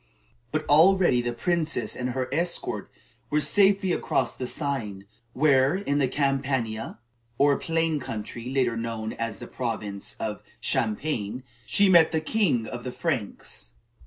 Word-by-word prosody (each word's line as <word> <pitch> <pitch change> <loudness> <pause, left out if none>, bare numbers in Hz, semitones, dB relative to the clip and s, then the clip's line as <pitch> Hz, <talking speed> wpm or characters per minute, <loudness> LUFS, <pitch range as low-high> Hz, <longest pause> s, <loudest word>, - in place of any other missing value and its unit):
But 155 0 -1
already 165 -3 +5
the 120 0 -2
princess 155 -2 -1
and 125 0 -3
her 130 0 -2
escort 170 +3 -1 0.4
were 150 - +2
safely 195 +4 +4
across - - 0
the 125 - -4
Seine, 120 -10 -2 0.3
where, 135 +1 +4
in 145 -7 -1
the 135 - +3
Campania, 135 -5 -1 0.4
or 140 0 +4
plain 165 -2 0
country, 115 0 -6
later 130 -3 +1
known 115 -1 -4
as 115 -3 -4
the - - -8
province 105 -5 -4
of 105 -2 -3 0.2
Champagne 120 -1 -1 0.2
she 200 - +4
met 170 -4 +6
the 160 - +1
king 155 - +1
of 120 +2 -7
the 125 - -4
Franks. 105 - -4
135 Hz, 140 wpm, -26 LUFS, 115-160 Hz, 0.4 s, met